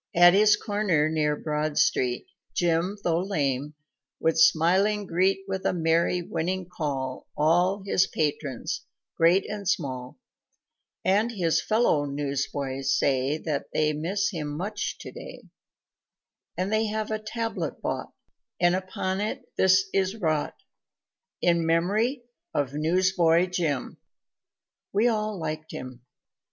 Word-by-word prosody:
At 175 Hz, +1 st, +8 dB
his 210 Hz, +1 st, +6 dB
corner 200 Hz, -8 st, +1 dB
near 150 Hz, -1 st, +1 dB
Broad 150 Hz, 0 st, -2 dB
street, 125 Hz, -1 st, +1 dB, 0.3 s
Jim, 175 Hz, +3 st, +1 dB
tho' 170 Hz, -1 st, +2 dB
lame, 145 Hz, -6 st, -1 dB, 0.4 s
would 160 Hz, -, +2 dB
smiling 190 Hz, +7 st, +4 dB
greet 190 Hz, +2 st, +1 dB
With 190 Hz, -1 st, -3 dB
a -, -, +1 dB
merry, 170 Hz, +1 st, +1 dB
winning 175 Hz, +2 st, -2 dB
call 135 Hz, -7 st, -4 dB
All 175 Hz, +6 st, +2 dB
his 190 Hz, -1 st, +3 dB
patrons, 145 Hz, -4 st, -2 dB, 0.3 s
great 175 Hz, +4 st, +4 dB
and 205 Hz, -2 st, -4 dB
small, 130 Hz, -8 st, -2 dB, 0.9 s
And 210 Hz, +5 st, +3 dB
his 175 Hz, -7 st, +1 dB
fellow 215 Hz, -10 st, +2 dB
newsboys 140 Hz, -1 st, -2 dB
say 135 Hz, +2 st, +1 dB
That 155 Hz, -3 st, -3 dB
they 155 Hz, 0 st, +2 dB
miss 185 Hz, +8 st, -1 dB
him 160 Hz, -5 st, -4 dB
much 190 Hz, +8 st, -3 dB
today, -, -, -10 dB, 1.1 s
And 185 Hz, +3 st, -1 dB
they 220 Hz, 0 st, +2 dB
have 215 Hz, 0 st, -3 dB
a 215 Hz, -, -1 dB
tablet 225 Hz, +1 st, -4 dB
bought, -, -, -3 dB, 0.5 s
And 175 Hz, 0 st, +4 dB
upon 185 Hz, +1 st, -2 dB
it 215 Hz, -, -3 dB
this 190 Hz, +1 st, +4 dB
is 190 Hz, +1 st, +1 dB
wrought: 155 Hz, -8 st, -1 dB, 0.9 s
"In 170 Hz, -1 st, +3 dB
memory 205 Hz, -, +1 dB, 0.3 s
of 140 Hz, -2 st, 0 dB
Newsboy 170 Hz, +2 st, +3 dB
Jim, 155 Hz, -7 st, -2 dB, 0.9 s
We 210 Hz, +4 st, +3 dB
all 215 Hz, -3 st, 0 dB
liked 155 Hz, -1 st, -5 dB
him." 130 Hz, -1 st, -8 dB
170 Hz, 125 wpm, -26 LUFS, 150-195 Hz, 1.1 s, At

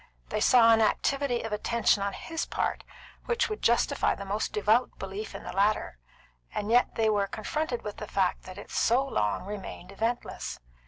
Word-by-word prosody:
They -, -, -1 dB
saw 230 Hz, -2 st, +6 dB
an 225 Hz, -, +4 dB
activity 260 Hz, +3 st, +1 dB
of 225 Hz, -1 st, -4 dB
attention 215 Hz, -1 st, +2 dB
on 200 Hz, 0 st, -1 dB
his 325 Hz, -1 st, -4 dB
part -, -, -2 dB, 0.4 s
which 470 Hz, -1 st, +1 dB
would 430 Hz, -, -4 dB
justify 235 Hz, +1 st, +2 dB
the 200 Hz, -, -7 dB
most 205 Hz, +2 st, -2 dB
devout 215 Hz, +4 st, +2 dB
belief 195 Hz, +3 st, -6 dB
in -, -, -7 dB
the -, -, -6 dB
latter, 195 Hz, -, +1 dB, 0.6 s
and 210 Hz, +1 st, -2 dB
yet 245 Hz, +1 st, +3 dB
they 225 Hz, -1 st, +2 dB
were 205 Hz, -2 st, +2 dB
confronted 245 Hz, +5 st, -3 dB
with 210 Hz, -1 st, -6 dB
the 210 Hz, -, -6 dB
fact 190 Hz, -3 st, 0 dB
that 185 Hz, 0 st, -9 dB
it 205 Hz, -, -10 dB
so 250 Hz, +4 st, +2 dB
long 105 Hz, -, -1 dB
remained 195 Hz, -2 st, -7 dB
eventless. 225 Hz, +4 st, -3 dB
215 Hz, 180 wpm, -28 LUFS, 200-240 Hz, 0.6 s, saw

